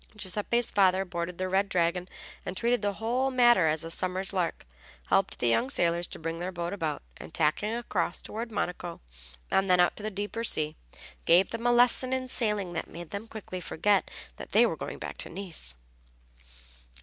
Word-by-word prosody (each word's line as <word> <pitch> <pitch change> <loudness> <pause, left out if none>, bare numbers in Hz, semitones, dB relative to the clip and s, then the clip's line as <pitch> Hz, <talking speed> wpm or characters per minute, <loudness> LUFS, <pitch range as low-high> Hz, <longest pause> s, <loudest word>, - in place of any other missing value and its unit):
Giuseppe's 210 +4 -1
father 190 -1 +4
boarded 170 -1 -4
the 185 - -1
Red 195 +2 +1
Dragon, 180 0 +1 0.4
and, 180 - -5
treating 235 +1 +2
the 205 -1 0
whole 240 +6 0
matter 240 -9 +5
as 155 0 +1
a 165 - -4
summer's 185 +3 -1
lark, 180 -3 -1 0.4
helped - - +2
the 120 - 0
young 175 - +2
sailors 170 -8 +2
to - - -7
bring 165 +1 -4
their 180 +2 -3
boat 175 0 -3
about, 160 -7 -2
and - - -10
tacking 165 +7 +1
across 195 -7 -1
toward 230 +2 -5
Monaco 175 -4 -3 0.5
and 195 0 +2
then 180 -1 +5
out 175 - +4
to - - -7
the 215 - -2
deeper 205 +3 -4
sea, 155 -8 +1 0.5
gave 175 +3 +5
them 230 +1 -2
a - - +5
lesson 245 +1 +4
in 260 0 -1
sailing 210 -8 -1
that 165 - -4
made 170 -1 -9
them 200 +3 -5
quickly 195 -5 -7
forget 195 +4 +1 0.3
that - - -9
they - - +7
were - - 0
going - - -6
back - - -6
to - - -3
Nice. 170 - -1
190 Hz, 190 wpm, -29 LUFS, 170-220 Hz, 0.5 s, they